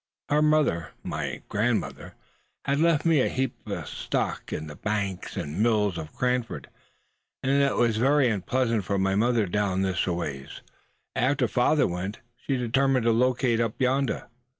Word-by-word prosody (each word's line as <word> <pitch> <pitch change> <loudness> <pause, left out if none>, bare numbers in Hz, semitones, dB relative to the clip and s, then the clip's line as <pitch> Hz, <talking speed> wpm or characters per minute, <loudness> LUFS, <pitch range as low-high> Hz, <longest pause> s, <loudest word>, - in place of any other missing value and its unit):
Her 150 +1 +3
mother, 150 - +2
my - - -4
grandmother, 110 +2 -1 0.5
had 140 +1 +1
left 165 -2 +3
me 160 -4 +4
a - - +1
heap 130 -1 -1
of - - -4
stock - - -3
in 75 - -3
the 75 -1 -9
bank 100 -2 -3
and 75 +7 -3
mills 105 -5 +2
of 75 -1 -7
Cranford; 125 -1 -1 0.7
and 135 - +1
as 140 - +4
it - - -3
was 115 -2 +2
very 135 +3 +4
unpleasant 115 +1 0
for 100 +3 -1
my 95 0 +1
mother 115 +2 +2
down 95 0 0
this 95 -1 0
aways, 75 -6 -4 0.5
after 130 0 +2
father 125 +7 +3
went, 90 +4 -3 0.2
she 135 - -4
had 130 - 0
determined 130 +1 +2
to 115 - +4
locate 125 0 +2
up 115 -2 -1
yondah." 130 -2 0
115 Hz, 165 wpm, -26 LUFS, 95-130 Hz, 0.7 s, me